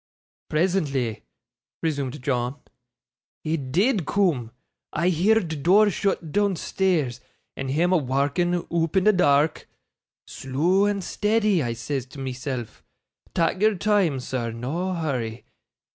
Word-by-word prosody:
'Presently,' 150 - 0 0.6
resumed 140 -4 -2
John, 125 0 -1 0.8
'he 155 +1 0
DID 170 - 0
coom. 165 - +1 0.4
I 170 +4 +1
heerd 180 -3 +1
door 205 +6 +5
shut 175 -4 -1
doonstairs, 185 -8 0 0.4
and 135 -1 -4
him 170 +7 +2
a - - +5
warking, 145 +6 0
oop 165 +1 +1
in 190 - +4
the 215 +1 +5
daark. 150 -4 +2 0.6
"Slow 165 +10 +1
and 205 -2 0
steddy," 210 -2 +1
I 120 -1 -2
says 125 +3 -4
to 140 +2 -12
myself, 130 -2 -5 0.5
"tak' 170 +3 +1
your 215 0 +4
time, 195 -7 +2
sir 125 -2 -3
no 160 +11 -3
hurry." 125 -8 -3
160 Hz, 120 wpm, -24 LUFS, 135-190 Hz, 0.8 s, door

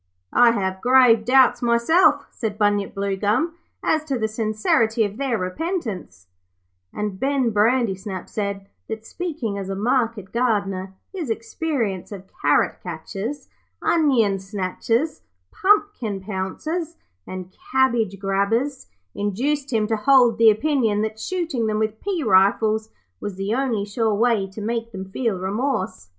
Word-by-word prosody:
'I 240 -1 +6
have 190 -3 -2
grave 250 -3 +5
doubts 260 +1 +5
myself,' 285 +6 +3
said 215 -3 -4
Bunyip 205 -1 +1
Bluegum, 205 - 0 0.3
'as 315 -1 +1
to 275 -4 -1
the 220 -2 0
sincerity 220 +1 +1
of 205 0 -3
their 265 -4 0
repentance'; 185 - -4 0.7
and 210 -2 -4
Ben 270 -3 +1
Brandysnap 210 -3 0
said 200 -2 -3 0.2
that, 220 0 -6
speaking 280 - -4
as 195 -1 -5
a 195 - -2
market 225 -2 0
gardener, 200 -6 -1 0.2
his 340 -9 -4
experience 225 - -2
of 195 -2 -7 0.2
carrot - - +2
catchers, 225 +8 -6 0.3
onion 250 - +2
snatchers, 205 - -2 0.3
pumpkin 385 - +1
pouncers, 255 - -4 0.3
and 185 0 -7 0.2
cabbage 235 -7 +2
grabbers 205 +8 0 0.3
induced 265 +8 -1
him 220 -3 +2
to 220 +1 0
hold 245 -1 +4
the 225 -1 +8
opinion 220 -3 +1
that 220 0 -4
shooting 325 -8 -2
them 215 0 0
with 215 0 -2
pea 370 -5 -2
rifles 215 +2 +3 0.3
was 205 - -5
the 195 +3 -2
only 240 -5 0
sure 215 +1 0
way 225 -3 +2
to 195 +3 -9
make 230 +1 -3
them 190 -1 -5
feel 225 -3 -1
remorse. 190 - -2
220 Hz, 135 wpm, -22 LUFS, 200-260 Hz, 0.7 s, the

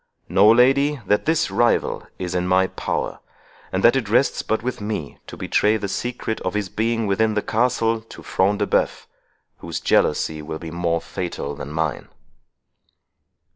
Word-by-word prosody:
Know, 95 +4 +5
lady, 135 +5 +4
that 105 +7 +1
this 160 0 +2
rival 120 0 +1
is 90 -1 -4
in 90 0 0
my 95 +1 +4
power, - - -3 0.5
and 95 +1 -1
that 120 - +6
it 120 -6 -1
rests 120 +5 +2
but 110 +1 -1
with 125 -3 -3
me 105 -9 -4
to - - -9
betray 105 +1 +2
the 100 -1 -4
secret 120 +1 -3
of 95 +2 -3
his 105 -3 -1
being 115 +2 0
within 110 +2 +1
the 105 - 0
castle 115 -1 +1
to 115 - -13
Front 100 +2 +1
de - - 0
Bœuf, - - 0 0.5
whose - - -5
jealousy 75 -1 +1
will 80 +1 -5
be 80 0 -8
more 85 -1 -1
fatal 85 -5 -5
than 70 - -7
mine." 80 -3 -2
105 Hz, 170 wpm, -22 LUFS, 90-115 Hz, 0.5 s, that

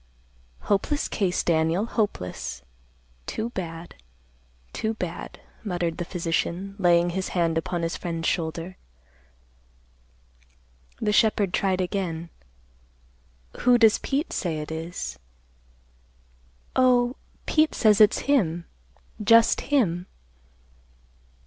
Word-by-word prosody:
"Hopeless 245 +9 0
case, 185 -4 0
Daniel; 165 +4 +2
hopeless. 90 - -3 0.6
Too 225 +2 -3
bad, 170 -4 -6 0.8
too 220 0 -2
bad," 180 -5 -6 0.2
muttered 175 -5 -2
the 175 - -2
physician, 175 +2 -2
laying 175 -1 +4
his 190 +1 -2
hand 165 -2 +2
upon 170 +1 -2
his 165 - -2
friend's 165 -2 -3
shoulder. 165 +2 -2 2.2
The 210 - 0
shepherd 210 -3 +3
tried 190 -1 +1
again, 175 -3 -3 1.3
"Who 245 0 +5
does 225 -2 +5
Pete 280 +4 -2
say 165 -4 -2
it 150 +1 -5
is?" 160 - -5 1.6
"Oh, 250 -1 +4 0.3
Pete 310 -1 +2
says 215 -1 +4
it's 210 - +5
him, 175 - +1 0.6
just 230 +2 +5
him." 185 - +1
180 Hz, 100 wpm, -25 LUFS, 165-220 Hz, 2.2 s, Who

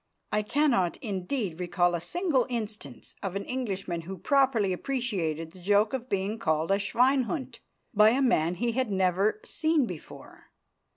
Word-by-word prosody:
I 210 - +2
cannot, 225 - +1
indeed, 195 - -3
recall 175 0 +1
a 170 - -1
single 320 - 0
instance 210 - -6
of 195 -1 -4
an 200 - -3
Englishman 195 -9 -3
who 190 +3 -7
properly 250 -5 +2
appreciated 180 - -2
the 185 - -15
joke 205 +5 +2
of 255 -1 -4
being 200 +3 -1
called 160 0 0
a 195 - +3
"Schweinhund" 260 +6 +1 0.3
by 215 0 +7
a 250 +4 +2
man 175 -9 +2
he 235 +6 0
had 255 0 -1
never 190 - +2
seen 315 - +1
before. 180 -8 -10
205 Hz, 155 wpm, -28 LUFS, 180-255 Hz, 0.3 s, by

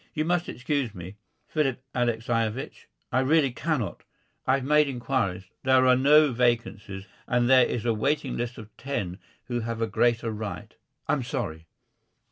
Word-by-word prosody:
"You 155 0 0
must 175 +1 0
excuse 125 -4 -2
me, 90 +3 -9 0.3
Philip 135 -5 -1
Alexeyevich, 115 0 -1 0.2
I 130 - +2
really 140 +1 +3
cannot. 130 - -2 0.5
I've 130 0 +2
made 150 +2 +4
inquiries. 120 -7 -1 0.2
There 130 0 +4
are 130 0 +6
no 145 +3 +5
vacancies, 115 -5 -1 0.2
and 120 -1 +2
there 130 -1 +6
is 120 -1 -3
a 115 - +2
waiting 140 +4 0
list 120 +1 -3
of 110 -1 -11
ten 100 -9 -4 0.2
who 120 -1 -3
have 115 0 -4
a 115 - +1
greater 115 0 +1
right 105 -6 -6 0.3
I'm 145 - +1
sorry." 105 - -4
120 Hz, 150 wpm, -26 LUFS, 110-135 Hz, 0.5 s, are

